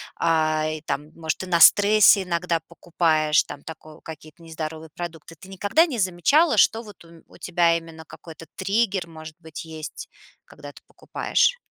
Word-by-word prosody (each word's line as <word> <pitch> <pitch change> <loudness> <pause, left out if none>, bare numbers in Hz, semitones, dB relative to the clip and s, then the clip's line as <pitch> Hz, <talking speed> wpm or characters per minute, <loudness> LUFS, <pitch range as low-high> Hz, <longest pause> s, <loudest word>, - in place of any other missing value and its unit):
а-а, 155 -1 0
и 155 -1 -6
там, 150 0 -5
может, 160 -1 -3
ты - - -7
на 175 -2 0
стрессе 205 +2 +6
иногда 170 -1 -2
покупаешь 160 -3 0
там 140 - -11
тако 155 -1 -12
какие-то 160 +1 -12
нездоровые 160 -1 -8
продукты? 165 -2 -8
Ты 190 - -14
никогда 205 - +2
не 265 -9 -5
замечала, 205 - +2
что 225 +2 +3
вот 210 -6 -15
у 165 - -18
м 165 -1 -18
у - - -18
тебя 170 -1 +1
именно 165 -1 -11
какой-то 165 +1 -13 0.2
триггер, 200 -3 0
может 155 -1 -12
быть, 160 0 -10
есть, 160 -1 -9 0.4
когда - - -13
ты - - -18
покупаешь? - - -1
165 Hz, 170 wpm, -23 LUFS, 160-190 Hz, 0.4 s, стрессе